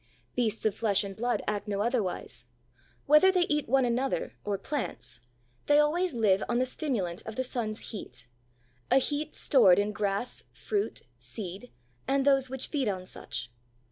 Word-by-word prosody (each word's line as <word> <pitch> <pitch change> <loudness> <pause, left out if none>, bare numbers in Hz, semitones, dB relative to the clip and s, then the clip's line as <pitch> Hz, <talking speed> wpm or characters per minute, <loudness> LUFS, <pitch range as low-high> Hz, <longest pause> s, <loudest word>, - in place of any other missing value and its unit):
Beasts 225 -3 0
of 215 - +3
flesh 210 -2 +2
and 195 -1 -6
blood 240 +3 -1
act 205 0 -2
no 200 -1 -1
otherwise. 200 - -2 0.6
Whether 300 +6 +7
they 365 -2 +3
eat 300 -6 -1
one 265 0 +4
another 250 +3 -1
or 205 -1 -1
plants, 195 - -4 0.5
they 290 - +5
always 315 +2 +2
live 210 -4 +3
on 240 - +1
the 255 - +2
stimulant 235 - -2
of 220 - -5
the 260 - 0
sun's 230 -4 -3
heat, 200 - -7 0.6
a - - +5
heat 290 +3 0
stored 195 -10 +5
in 205 +1 +1
grass, 205 +3 -2
fruit, 415 -1 -3 0.2
seed, 200 +3 -7 0.4
and 275 0 +2
those 270 -2 +4
which 265 0 -3
feed 280 -6 0
on 185 -3 -2
such. 125 -8 -6
235 Hz, 165 wpm, -29 LUFS, 200-270 Hz, 0.6 s, Whether